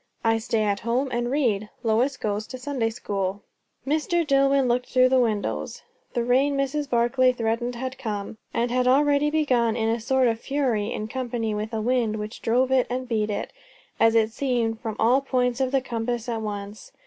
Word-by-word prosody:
"I 225 -1 +2
stay 225 -1 0
at 205 -1 0
home 245 +4 0
and 240 0 -1
read. 225 -7 0
Lois 240 +5 +1
goes 210 0 -2
to 255 - -7
Sunday 250 -3 -1
school." 200 -2 -3 0.4
Mr. 315 +4 +1
Dillwyn 275 -1 +3
looked 245 +1 0
to 255 -1 +6
the 260 0 +3
windows. 220 -4 -1 0.3
The 240 - +1
rain 270 +4 +2
Mrs. 275 +1 -1
Barclay 250 +1 +3
threatened 240 +1 -1
had 260 +2 -5
come; 215 -3 -5
and 235 +1 -1
had 250 0 +1
already 285 +2 +4
begun 255 -7 +2
in 225 -1 0
a 230 +1 0
sort 255 +2 +2
of 225 -1 0
fury, 240 -6 -1
in 215 - -3
company 235 -3 -3
with 210 +1 -3
a 220 -1 -2
wind, 235 -2 +1
which 210 0 -6
drove 255 +3 +2
it 260 -1 +3
and 255 +1 -3
beat 215 -3 0
it, 205 - -4 0.5
as 225 0 +4
it 225 -1 +3
seemed, 235 -3 -1
from 220 -3 -4
all 250 +4 +3
points 250 -2 0
of 260 -1 +1
the 270 -1 +2
compass 235 -1 -3
at 230 -2 -2
once. 205 0 -6
240 Hz, 195 wpm, -25 LUFS, 225-260 Hz, 0.5 s, to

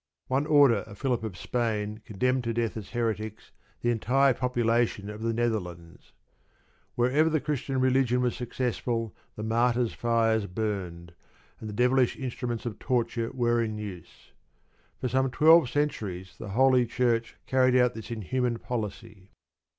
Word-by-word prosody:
One 135 +3 0
order 145 -7 +6
of 100 -2 -11
Philip 125 -3 -1
of 105 -6 -5
Spain 110 -2 -2
condemned 125 +5 0
to 115 -1 -2
death 115 -1 -1
as 105 -4 -7
"heretics" 110 -2 -3 0.3
the 120 - +2
entire 130 +4 +3
population 120 -4 0
of 105 +1 -9
the 115 0 0
Netherlands. 90 -8 -3 0.8
Wherever 135 +7 +3
the 155 -1 +1
Christian 140 -3 -2
religion 130 -1 +2
was 125 -1 0
successful 120 -2 -2 0.2
the 105 - -6
martyrs' 120 +1 +1
fires 115 -3 +1
burned, 90 -4 -4 0.5
and 110 - -7
the - - -5
devilish 125 +3 +2
instruments 125 -3 -4
of 115 -5 -5
torture 120 -2 -1
were 120 -2 +1
in 110 -2 -2
use. 100 -5 -9 0.7
For - - -1
some 130 +2 +1
twelve 155 +1 +6
centuries 100 -11 -2
the 105 - -7
Holy 125 +3 +4
Church 115 -1 0
carried 130 -1 +3
out 125 -1 +4
this 110 -3 -9
inhuman 120 +2 -1
policy. 105 -4 -6
120 Hz, 145 wpm, -27 LUFS, 110-125 Hz, 0.8 s, order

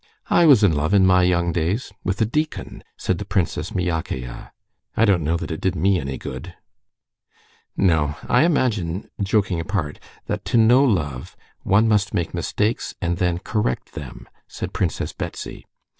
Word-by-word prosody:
"I 170 - +5
was 130 -8 +7
in 95 -5 +5
love 80 +7 +1
in 95 -2 +6
my 90 0 +5
young 85 -1 +2
days 90 +7 -1
with 95 +1 -2
a - - +5
deacon," 150 +8 -3
said 90 -2 -1
the - - -3
Princess 100 -3 -1
Myakaya. 80 -9 -3 0.5
"I 115 - +5
don't 95 -6 +3
know 80 +3 +1
that 85 - -5
it 80 - -4
did 95 -1 0
me 95 +3 +2
any 70 -1 -4
good." - - -7 1.2
"No; 80 -6 +2
I 125 - +4
imagine, 110 - 0
joking 100 -3 +1
apart, 85 -4 -3 0.3
that - - -3
to - - +1
know 120 +4 +6
love, 75 - -1 0.2
one 105 +4 +3
must 105 -3 +1
make 85 -2 -1
mistakes 110 +3 -1
and 85 -2 -1
then 90 -2 +1
correct 105 - -2
them," - - -9 0.2
said - - -6
Princess - - -2
Betsy. - - -7
95 Hz, 165 wpm, -22 LUFS, 80-105 Hz, 1.2 s, was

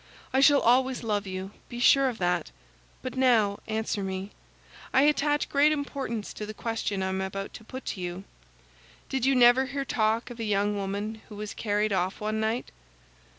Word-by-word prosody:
I 265 - +4
shall 280 +1 +6
always 255 +2 +3
love 205 -3 -1
you; 190 +1 -5 0.2
be 240 - -6
sure 270 +2 +5
of 240 - -6
that. 175 -2 0 0.5
But 255 -1 -5
now 230 -6 +3
answer 220 -1 -2
me. 190 +1 -4 0.6
I 265 - +6
attach 295 0 +2
great 290 +2 +4
importance 275 -7 -3
to 210 - -6
the 215 - -7
question 225 -4 -2
I 190 - -1
am 190 0 -2
about 195 +1 -4
to - - -10
put 260 +3 -8
to 190 - -8
you. 175 +1 -5 0.9
Did 265 -1 0
you 270 - +4
never 250 +1 +6
hear 275 0 -3
talk 225 -1 0
of 240 - -10
a - - -2
young 205 -1 +1
woman 205 +2 -3
who 210 - -9
was 210 0 -6
carried 210 -1 0
off 185 0 -1
one 215 +1 -2
night?" 220 +3 -1
220 Hz, 190 wpm, -27 LUFS, 200-260 Hz, 0.9 s, shall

